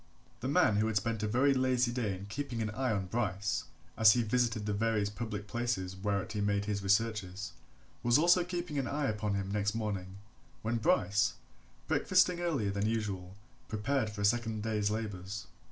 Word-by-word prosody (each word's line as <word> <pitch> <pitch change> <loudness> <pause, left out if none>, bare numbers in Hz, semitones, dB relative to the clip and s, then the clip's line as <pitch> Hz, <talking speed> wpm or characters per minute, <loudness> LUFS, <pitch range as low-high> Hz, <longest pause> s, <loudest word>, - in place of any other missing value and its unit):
The - - -3
man 105 - +4
who 110 +1 +2
had 110 - -2
spent 110 +1 -1
a 110 - 0
very 130 +6 +3
lazy 130 -2 +2
day 115 -6 -1
in 95 - -8
keeping 120 +3 -4
an 110 - -2
eye 125 +3 -1
on 100 -3 -1
Bryce, 100 -1 -1 0.3
as 110 -1 +7
he 120 - +2
visited 115 -1 +1
the 105 - 0
various 105 -1 +1
public 105 -2 -5
places 105 -5 -2
whereat 100 0 -2
he 105 -2 -2
made 100 0 +1
his 105 -1 -1
researches, 100 -1 0 0.5
was 120 +2 +4
also 175 +3 +5
keeping 175 -4 -3
an 130 - -1
eye 145 +2 -1
upon 105 -3 -1
him 100 0 -2
next 105 +1 0
morning, 100 -4 -3 0.5
when 115 +2 0
Bryce, 100 -4 +2 0.5
breakfasting 180 -1 +3
earlier 145 - 0
than 100 +2 0
usual, 100 -5 -2 0.3
prepared 110 +2 0
for 105 -1 -6
a - - +2
second 110 -1 +1
day's 105 -2 0
labours. 105 -3 -4
105 Hz, 185 wpm, -32 LUFS, 100-120 Hz, 0.5 s, as